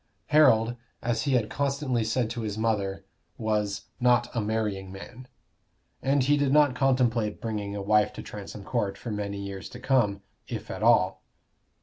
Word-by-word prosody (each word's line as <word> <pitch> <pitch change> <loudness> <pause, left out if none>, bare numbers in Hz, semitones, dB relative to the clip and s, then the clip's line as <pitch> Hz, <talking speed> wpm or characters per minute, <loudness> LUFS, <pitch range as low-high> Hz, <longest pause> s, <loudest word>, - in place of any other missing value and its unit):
Harold, 120 -6 +5 0.3
as 115 0 0
he 140 - +1
had 120 -4 +2
constantly 140 -3 -1
said 115 +2 0
to 120 +1 -4
his 105 -2 -3
mother, 105 -3 -1 0.3
was 105 -2 -1 0.2
"not 120 -1 +2
a 115 - +1
marrying 105 -3 -2
man"; 125 +6 -10 1.0
he 145 +3 +3
did 145 -2 +1
not 145 -2 +5
contemplate 125 -5 +1
bringing 105 -3 -3
a 100 - -4
wife 105 +1 +3
to - - -8
Transome 100 0 -8
Court 100 -4 -1
for 120 - -6
many 100 -1 -3
years 100 -1 -6
to 125 - -10
come, 115 -7 +1 0.2
if - - -6
at - - -6
all. - - +4
110 Hz, 160 wpm, -27 LUFS, 105-125 Hz, 1.0 s, Harold